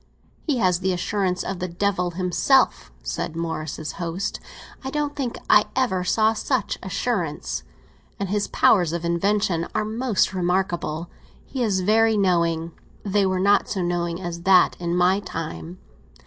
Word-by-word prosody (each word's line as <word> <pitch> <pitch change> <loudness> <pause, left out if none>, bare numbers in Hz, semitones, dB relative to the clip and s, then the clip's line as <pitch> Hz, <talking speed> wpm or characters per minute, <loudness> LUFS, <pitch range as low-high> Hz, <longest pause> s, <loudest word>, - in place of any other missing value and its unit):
"He 290 -4 +1
has 185 -5 +2
the 185 0 0
assurance 185 0 -1
of 190 -2 -4
the 185 - -2
devil 180 0 0
himself," 180 - +2
said 60 - -3
Morris's 160 -2 -4
host; 175 +3 -3 0.4
"I 265 - -3
don't 295 0 -2
think 265 -5 -3
I - - +6
ever 240 -9 +1
saw 220 +4 +3
such 220 -1 -1
assurance. 185 -5 -2 0.6
And 200 -2 -2
his 205 +1 0
powers 175 -6 +3
of 170 0 -3
invention 170 0 +1
are 215 - +1
most 220 -2 0
remarkable. 175 -3 -1 0.3
He 265 - -5
is 200 -5 +1
very 220 +3 +3
knowing; 170 -4 +1 0.3
they 200 0 +2
were 185 -1 0
not 200 +2 +3
so 190 -3 -1
knowing 175 -1 -1
as 175 -2 -5
that 185 -1 +5
in 170 0 -1
my 180 +2 +3
time. 165 -2 -6
185 Hz, 150 wpm, -23 LUFS, 170-210 Hz, 0.6 s, I